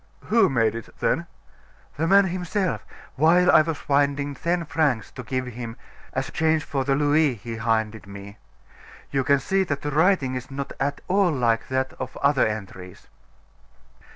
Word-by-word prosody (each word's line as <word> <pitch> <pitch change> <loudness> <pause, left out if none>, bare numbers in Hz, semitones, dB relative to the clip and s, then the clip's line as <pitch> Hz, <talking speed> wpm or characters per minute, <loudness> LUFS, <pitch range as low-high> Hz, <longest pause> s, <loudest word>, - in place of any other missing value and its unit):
"Who 220 -4 +5
made 115 -5 +2
it, 115 -1 -7
then?" - - 0 0.7
"The 160 +2 -1
man 195 +2 +6
himself, 185 +1 -2 0.3
while 175 +5 +5
I - - +7
was 160 -1 -2
finding 140 0 0
ten 170 +4 -1
francs 145 -7 0
to 125 - -8
give 130 +1 -3
him 120 -1 -7 0.4
as 130 +1 -3
change 160 -2 +1
for 135 -2 -2
the 135 +1 +1
louis 145 -1 +2
he 115 +2 -7
handed 110 -2 -1
me. 100 +1 -10 0.7
You 135 -1 +1
can 140 +2 +4
see 190 +8 +1
that 145 -5 -3
the 145 - -2
writing 155 -4 +2
is 125 +1 -5
not 140 0 -5
at 140 +1 -2
all 195 0 +3
like 120 -5 0
that 130 0 -1
of 130 0 -6
other 140 -3 +3
entries." 95 -4 -7
140 Hz, 165 wpm, -24 LUFS, 120-160 Hz, 0.7 s, I